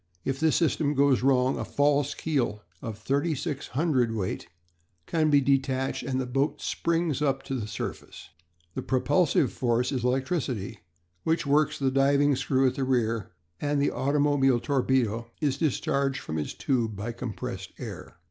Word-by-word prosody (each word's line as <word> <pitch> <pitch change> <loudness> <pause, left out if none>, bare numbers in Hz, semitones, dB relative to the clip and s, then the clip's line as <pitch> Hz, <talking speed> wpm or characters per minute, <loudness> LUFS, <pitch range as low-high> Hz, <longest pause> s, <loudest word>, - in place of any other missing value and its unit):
If 135 0 -1
this 160 0 +3
system 150 -2 +1
goes 140 -2 +4
wrong 130 0 +3
a - - -1
false 145 0 +1
keel 125 -9 -1 0.2
of 110 -2 -5
thirty 140 +8 0
six 145 0 -4
hundredweight 125 - 0 0.6
can 155 -2 +1
be 145 -1 +5
detached 135 -1 +1
and 130 -1 -2
the 130 - -1
boat 135 +4 0
springs 165 -4 -1
up 135 -2 +1
to - - -5
the 115 -5 -3
surface. - - -6 0.4
The - - -3
propulsive 135 +5 +2
force 125 0 +1
is 130 -4 -2
electricity, 125 - -1 0.4
which 165 0 0
works 150 +2 +2
the 135 -2 +1
driving 140 +1 +3
screw 135 0 +1
at 130 - +3
the 135 - -2
rear, 115 -7 0 0.3
and 145 0 0
the 140 - +2
automobile 140 -2 +2
torpedo 125 -4 0
is 140 -3 0
discharged 140 -3 0
from 80 -8 -4
its 75 - -4
tube 115 -5 0
by 105 +4 -4
compressed 115 -4 -6
air. - - -8
135 Hz, 155 wpm, -27 LUFS, 125-145 Hz, 0.6 s, be